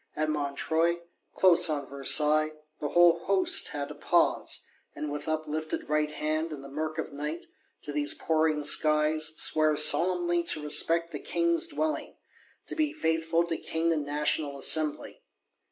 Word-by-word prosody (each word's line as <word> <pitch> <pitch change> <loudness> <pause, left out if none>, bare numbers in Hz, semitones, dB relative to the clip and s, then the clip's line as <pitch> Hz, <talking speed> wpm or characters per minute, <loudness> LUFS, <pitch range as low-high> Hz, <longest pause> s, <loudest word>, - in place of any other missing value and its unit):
At 155 0 -1
Montreuil, 160 +4 -1 0.3
close 180 -2 +5
on 145 -2 -2
Versailles, 150 +3 +2 0.3
the 145 - -4
whole 175 0 +4
Host 195 -1 +3
had 145 -1 -5
to - - -7
pause; - - 0 0.3
and, 150 -1 -5
with 145 +2 -6
uplifted 155 0 -4
right 150 0 0
hand, 155 +2 -3
in 145 -3 -8
the 140 - -11
murk 155 +2 -4
of 160 - -5
Night, 150 +4 -6 0.4
to 150 - -4
these 145 0 -1
pouring 155 -2 0
skies, 155 +1 +2
swear 155 -1 +2
solemnly 175 +3 +3
to 155 -2 0
respect 165 +3 +3
the - - -6
King's 340 0 0
Dwelling; 310 -1 -4 0.5
to - - -3
be 310 -2 -1
faithful 165 - 0
to 165 -1 -3
King 165 +1 -2
and 155 -2 -2
National 145 0 -1
Assembly. 150 +2 0
155 Hz, 155 wpm, -27 LUFS, 150-170 Hz, 0.5 s, close